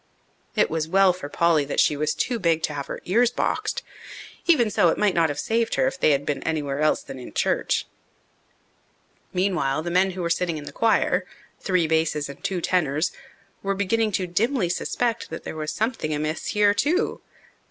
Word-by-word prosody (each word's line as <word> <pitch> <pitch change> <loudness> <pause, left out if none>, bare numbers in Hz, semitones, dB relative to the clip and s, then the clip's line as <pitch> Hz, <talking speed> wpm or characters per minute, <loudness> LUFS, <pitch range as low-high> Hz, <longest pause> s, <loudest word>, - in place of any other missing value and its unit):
It - - +2
was 160 -1 -1
well 190 +1 +4
for 160 -5 -8
Polly 165 -1 +3
that 140 - -2
she 150 - +4
was 150 +1 -1
too 245 -2 -1
big 165 -4 +1
to 150 - -1
have 140 -1 -5
her - - -6
ears 230 +6 +3
boxed. - - -2 0.6
Even 245 -11 +4
so, 175 - +4
it - - 0
might 210 -3 +2
not 165 -2 +3
have 145 - -4
saved 225 0 0
her - - +2
if 265 0 -2
they - - +4
had 145 -1 +2
been 145 - -2
anywhere 145 -3 -2
else 155 0 +2
than 130 - -9
in 125 - -10
church. - - +1 1.5
Meanwhile 175 -6 0
the 175 - -3
men 185 +2 +3
who 180 - -2
were 170 - -1
sitting 170 -1 0
in 150 - -7
the 145 - -8
choir 200 -1 +1 0.3
three 185 -3 +1
basses 155 -2 0
and 140 +6 -11
two 190 -3 -1
tenors 160 -3 +1 0.5
were 195 0 -1
beginning 215 +3 +1
to 190 - 0
dimly 205 +3 0
suspect 235 +5 -1
that 165 - -7
there - - -6
was 155 -1 -3
something 220 -8 -2
amiss 155 +2 -3
here 210 -1 +3
too. 315 - 0
175 Hz, 195 wpm, -24 LUFS, 155-205 Hz, 1.5 s, well